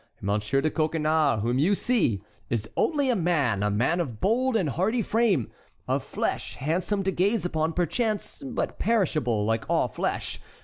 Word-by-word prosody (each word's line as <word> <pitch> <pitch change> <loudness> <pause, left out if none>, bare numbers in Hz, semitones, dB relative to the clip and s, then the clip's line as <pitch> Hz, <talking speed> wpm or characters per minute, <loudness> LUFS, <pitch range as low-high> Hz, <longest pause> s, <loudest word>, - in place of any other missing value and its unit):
Monsieur 105 +6 0
de 155 - 0
Coconnas, 155 -6 +1
whom 120 +3 +1
you 185 +8 +3
see, 180 - +1 0.3
is 110 -2 -1
only 285 -5 +2
a - - +1
man—a 140 - +1
man 120 - +1
of 125 -11 -3
bold 245 +5 +1
and 180 -10 +1
hardy 215 - 0
frame, 210 - +1 0.4
of - - 0
flesh - - -3
handsome 180 +7 -1
to 190 - +1
gaze 195 +1 +1
upon 160 -2 0
perchance, 210 +6 -1
but 135 - -3
perishable, 155 - +1
like 110 +1 0
all - - +2
flesh. - - -3
160 Hz, 160 wpm, -26 LUFS, 125-205 Hz, 0.4 s, you